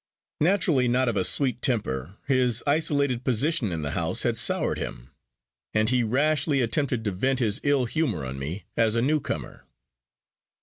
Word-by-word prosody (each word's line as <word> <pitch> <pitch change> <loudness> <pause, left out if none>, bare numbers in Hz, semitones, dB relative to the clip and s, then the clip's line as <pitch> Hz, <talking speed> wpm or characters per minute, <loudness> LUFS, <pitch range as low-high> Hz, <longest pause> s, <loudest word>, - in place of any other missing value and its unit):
Naturally 160 -7 +2
not 125 +2 +2
of 115 - -2
a 95 - +1
sweet 125 +2 +1
temper, 95 - -1
his 125 -4 +1
isolated 140 -4 +1
position 130 - +1
in 80 -2 -3
the 75 - -2
house - - 0
had - - +1
soured - - +1
him, - - -6 0.6
and 110 0 +3
he 125 -1 +3
rashly 140 +4 +1
attempted 125 -1 0
to 105 - 0
vent 130 +8 0
his 110 -4 0
ill 145 -3 +2
humor 120 - -1
on 65 +1 -5
me, 80 +8 -5
as 115 -1 +2
a 115 - +2
newcomer. 150 +2 -2
125 Hz, 165 wpm, -25 LUFS, 105-140 Hz, 0.6 s, and